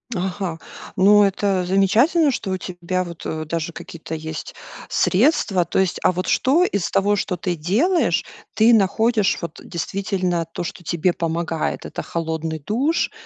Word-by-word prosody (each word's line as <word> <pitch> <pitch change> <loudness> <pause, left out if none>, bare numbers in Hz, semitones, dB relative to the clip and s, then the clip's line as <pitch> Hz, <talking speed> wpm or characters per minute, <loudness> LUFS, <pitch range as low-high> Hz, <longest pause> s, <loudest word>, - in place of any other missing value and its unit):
Ага. 185 -2 -3 0.4
Ну 205 +2 +6
это 195 -1 +1
замечательно, 235 - +3
что 210 -5 -4
у 185 - 0
тебя 185 0 -3
вот, 170 -2 -9
э, 155 0 -3
даже 165 +1 -3
какие-то 160 -1 -8
есть 160 0 -6 0.3
средства. 195 - +2
То - - -3
есть. 190 -2 0
А - - +5
вот 185 +1 -3
что 300 +7 +3
из 200 - 0
того, 205 +1 +2
что 185 -2 -2
ты 175 0 -2
делаешь, 235 - +1 0.3
ты 225 +2 +5
находишь 220 +1 +2
вот 170 -1 -7
действительно 180 -1 -2
то, - - -4
что 175 +1 -7
тебе 170 +1 0
помогает? 165 -1 -2
Это - - -5
холодный 160 -1 -3
душ, 260 - 0
185 Hz, 155 wpm, -21 LUFS, 170-205 Hz, 0.4 s, Ну